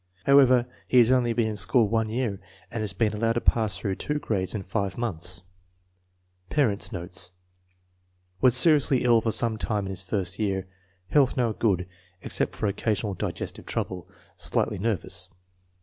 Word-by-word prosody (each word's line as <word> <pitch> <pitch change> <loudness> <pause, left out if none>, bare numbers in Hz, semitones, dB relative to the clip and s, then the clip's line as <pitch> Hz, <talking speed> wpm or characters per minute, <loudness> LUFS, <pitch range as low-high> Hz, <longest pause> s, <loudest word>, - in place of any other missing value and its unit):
However, 130 -3 +6 0.2
he 125 - +2
has 120 0 +6
only 125 -2 +3
been 115 -1 +1
in 110 - -4
school 105 +2 +4
one 110 +1 0
year 115 -4 -2 0.3
and 115 -2 -3
has 105 -3 -1
been 110 +3 0
allowed 115 +2 0
to 120 - -1
pass 110 -5 +2
through 95 +3 -3
two 150 - -2
grades 105 -9 -2
in 100 - -3
five 100 +1 -3
months. 90 -6 -3 1.1
Parents 120 -9 0
9 95 - -4
notes. 90 +2 -4 1.1
Was 130 -1 +5
seriously 145 -3 +4
ill 120 -2 +4
for 115 - 0
some 110 0 +1
time 105 -3 -1
in 95 - -4
his 95 -1 -4
first 95 0 -2
year. 95 -3 -1 0.4
Health 140 -2 +3
now 120 -3 +2
good, 95 -5 0 0.4
except - - -1
for - - -3
occasional 105 0 -1
digestive - - -5
trouble. 90 -3 -4 0.3
Slightly - - 0
nervous. 95 -3 -1
110 Hz, 165 wpm, -26 LUFS, 95-120 Hz, 1.1 s, However